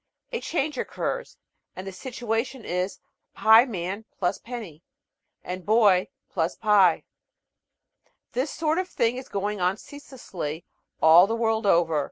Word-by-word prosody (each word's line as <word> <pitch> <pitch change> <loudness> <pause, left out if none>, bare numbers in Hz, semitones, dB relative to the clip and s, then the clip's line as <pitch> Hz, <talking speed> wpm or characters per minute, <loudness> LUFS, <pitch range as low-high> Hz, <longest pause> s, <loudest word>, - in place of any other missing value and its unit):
A 470 - -3
change 300 -4 -2
occurs, - - -4 0.4
and 185 - -7
the 195 - -5
situation 240 +3 -4
is 180 +2 -2 0.4
"Pieman 215 -2 +3 0.2
+ 175 - -1
penny" 220 -11 -8 0.6
and 180 +1 -6
"Boy 205 -3 +4 0.3
+ 165 -1 -1
pie." 200 -6 +4 1.3
This 260 +5 -1
sort 315 +3 0
of 370 0 -3
thing 235 -4 0
is 260 - -8
going 205 0 -3
on 180 +3 +1
ceaselessly 195 - -8 0.4
all 165 +4 +8
the 225 - -1
world 225 -2 0
over. 165 -4 +3
215 Hz, 130 wpm, -25 LUFS, 180-245 Hz, 1.3 s, all